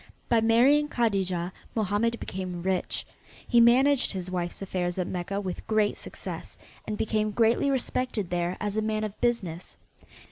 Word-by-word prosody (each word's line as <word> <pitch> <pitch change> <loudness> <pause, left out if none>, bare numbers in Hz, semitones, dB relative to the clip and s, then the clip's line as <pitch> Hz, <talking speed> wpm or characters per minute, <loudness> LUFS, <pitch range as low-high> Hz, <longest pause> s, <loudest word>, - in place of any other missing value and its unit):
By 235 -2 +4
marrying 260 +7 +4
Kadijah 190 - 0 0.2
Mohammed 220 +2 +1
became 180 -2 -5
rich. 185 -1 -1 0.4
He 240 -2 +5
managed 260 +4 +5
his 185 -1 -4
wife's 175 -1 -3
affairs 180 -2 -2
at 180 - 0
Mecca 185 +3 -3
with 185 -3 -5
great 215 -1 +2
success, - - -7 0.3
and 210 - -2
became 215 0 0
greatly 230 +5 +2
respected 255 -7 -1
there 175 +1 -1
as 205 -1 -2
a 220 - +1
man 215 0 -1
of 210 -1 -5
business. 200 -9 -1
210 Hz, 150 wpm, -27 LUFS, 185-235 Hz, 0.4 s, He